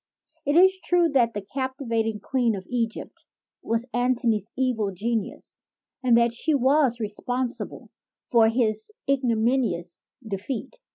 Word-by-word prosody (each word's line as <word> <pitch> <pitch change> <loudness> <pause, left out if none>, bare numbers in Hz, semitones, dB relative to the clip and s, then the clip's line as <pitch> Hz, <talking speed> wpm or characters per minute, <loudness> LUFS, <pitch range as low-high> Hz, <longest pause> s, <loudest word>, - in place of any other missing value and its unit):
It 285 - +2
is 380 +2 +6
true 350 -2 +3
that 240 -6 +2
the 205 - -3
captivating 230 -4 -2
queen 245 -3 +1
of 190 -1 -7
Egypt 230 -2 -3 0.3
was 230 +1 -1
Antony's 240 -4 +1
evil 245 -6 +1
genius 220 +3 -3 0.5
and 245 -3 +4
that 235 0 +3
she 305 +6 +2
was 270 -1 +3
respon 245 +3 -2
sible - - -7 0.4
for 225 -2 +6
his 225 - 0 0.2
ignominious 235 -8 0 0.3
defeat. 215 - -5
235 Hz, 125 wpm, -25 LUFS, 220-260 Hz, 0.5 s, is